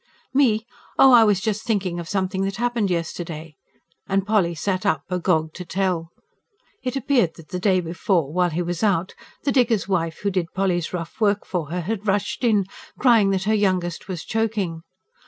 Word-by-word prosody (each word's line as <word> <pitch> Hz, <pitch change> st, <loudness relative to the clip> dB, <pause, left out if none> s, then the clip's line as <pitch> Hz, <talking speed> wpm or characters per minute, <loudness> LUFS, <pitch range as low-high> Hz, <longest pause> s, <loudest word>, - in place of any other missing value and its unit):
"Me? 230 Hz, -5 st, +3 dB, 0.3 s
Oh, 270 Hz, -, +7 dB
I 235 Hz, -2 st, +9 dB
was 205 Hz, -3 st, +3 dB
just 215 Hz, +1 st, -1 dB
thinking 195 Hz, -7 st, -1 dB
of 170 Hz, 0 st, -7 dB
something 190 Hz, -1 st, -1 dB
that 195 Hz, 0 st, -1 dB
happened 235 Hz, -3 st, 0 dB
yesterday" 165 Hz, -2 st, -4 dB, 0.5 s
and 195 Hz, 0 st, +1 dB
Polly 195 Hz, -5 st, +2 dB
sat 185 Hz, +2 st, -1 dB
up, 140 Hz, -2 st, +1 dB
agog 165 Hz, -3 st, +1 dB
to 180 Hz, -, -7 dB
tell. 180 Hz, -2 st, -1 dB, 0.7 s
It 255 Hz, 0 st, -3 dB
appeared 245 Hz, -, +1 dB
that 165 Hz, -2 st, -14 dB
the 180 Hz, -, -3 dB
day 185 Hz, -1 st, +3 dB
before, 170 Hz, -3 st, -1 dB
while 180 Hz, 0 st, +2 dB
he 170 Hz, +2 st, -2 dB
was 175 Hz, 0 st, -3 dB
out, 190 Hz, -4 st, +1 dB, 0.3 s
the 280 Hz, -, +1 dB
digger's 235 Hz, -7 st, +2 dB
wife 165 Hz, -4 st, -1 dB
who 200 Hz, -, +1 dB
did 180 Hz, -3 st, -2 dB
Polly's 180 Hz, -4 st, 0 dB
rough 170 Hz, +3 st, -6 dB
work 205 Hz, -1 st, +2 dB
for 170 Hz, -6 st, -3 dB
her 180 Hz, +2 st, -2 dB
had 210 Hz, +4 st, -4 dB
rushed 205 Hz, +5 st, 0 dB
in, 210 Hz, -5 st, +3 dB, 0.3 s
crying 230 Hz, -6 st, +5 dB
that 190 Hz, -1 st, 0 dB
her 215 Hz, +3 st, +1 dB
youngest 185 Hz, -6 st, 0 dB
was 180 Hz, -5 st, -5 dB
choking. 210 Hz, -7 st, -1 dB
190 Hz, 185 wpm, -23 LUFS, 170-215 Hz, 0.7 s, I